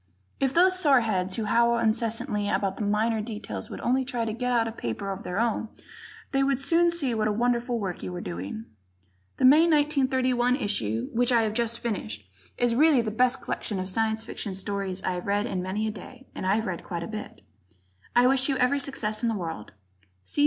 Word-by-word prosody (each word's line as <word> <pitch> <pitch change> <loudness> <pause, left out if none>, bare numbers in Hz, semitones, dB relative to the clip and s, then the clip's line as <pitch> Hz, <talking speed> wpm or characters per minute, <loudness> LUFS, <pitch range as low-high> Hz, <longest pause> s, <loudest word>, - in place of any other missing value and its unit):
If 270 -1 +1
those 370 +4 +4
soreheads 220 - +2
who 225 - -2
howl 235 +2 +3
incessantly 225 -1 0
about 195 0 -1
minor 215 +2 +1
details 210 - -5
would - - -7
only 260 +2 +1
try 245 -3 -2
to 220 - -2
get 250 +2 -2
out 230 -2 +2
a - - -3
paper 195 - -4
of 195 - -5
their 180 - -5
own 225 -1 0 0.6
they 270 - +2
would 275 -1 +1
soon 335 +5 +3
see 305 -8 0
what 215 -1 0
a - - +1
wonderful 240 +2 0
work 195 -5 -4
you - - -5
are - - -4
doing. 95 - -6 0.7
The - - +2
May 305 +6 +7
1931, 260 -5 +2
issue, 115 - -1
which 245 +2 +2
I 235 -2 +4
have 215 -1 -1
just 230 0 0
finished, 105 - -5 0.3
is 245 -1 +2
really 285 -1 +4
the 215 - -3
best 250 +4 +1
collection 205 - -3
of 185 0 -2
Science 220 +2 0
Fiction 205 -3 -4
stories 195 -1 -3
I've 180 0 -3
read 205 +1 +1
in 190 -6 -2
many 190 +4 -2
a - - -1
day, 240 +6 -11
and 185 - -4
I've 215 +4 +2
read 185 -5 -4
quite 170 -1 -5
a - - -5
bit. 215 -1 -7 0.7
I 245 +1 +6
wish 265 +1 +3
you 270 - +1
every 255 +3 +2
success 220 -6 -1
in 235 - +1
the 225 - -1
world. 165 - -6
225 Hz, 200 wpm, -26 LUFS, 200-250 Hz, 0.7 s, May